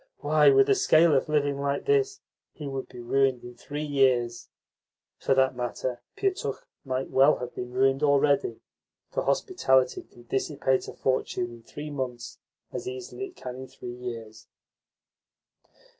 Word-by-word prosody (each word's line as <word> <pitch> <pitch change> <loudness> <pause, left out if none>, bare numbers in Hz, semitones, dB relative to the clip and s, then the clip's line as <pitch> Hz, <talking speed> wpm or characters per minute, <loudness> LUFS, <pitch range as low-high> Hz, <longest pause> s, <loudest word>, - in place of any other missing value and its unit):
"Why, - - +5
with 405 0 +5
a 415 - +5
scale 170 - +5
of 135 +2 +1
living 145 -2 +1
like 140 0 -1
this, 410 -1 +2 0.3
he 150 - -7
would 135 -1 -5
be 125 - -11
ruined 130 0 +1
in 120 - -9
three 145 +5 -6
years." 130 -5 +1 0.7
For 135 - +2
that 130 -1 +3
matter, 125 0 -3 0.2
Pietukh 395 +5 -2 0.2
might 130 -1 -3
well 135 +3 +6
have 125 - -6
been 125 0 -6
ruined 135 +2 +2
already, 140 -4 +2 0.5
for - - -1
hospitality 130 - +2
can 120 - -18
dissipate 135 +1 0
a - - -7
fortune 125 -2 -1
in 120 -1 -12
three 150 +6 -8
months 125 -4 -5 0.3
as 370 - -5
easily 395 0 -5
as - - -9
it 360 - -20
can 125 -1 -7
in 130 0 -8
three 120 -1 -8
years. 115 -3 -8
135 Hz, 160 wpm, -27 LUFS, 125-150 Hz, 0.7 s, well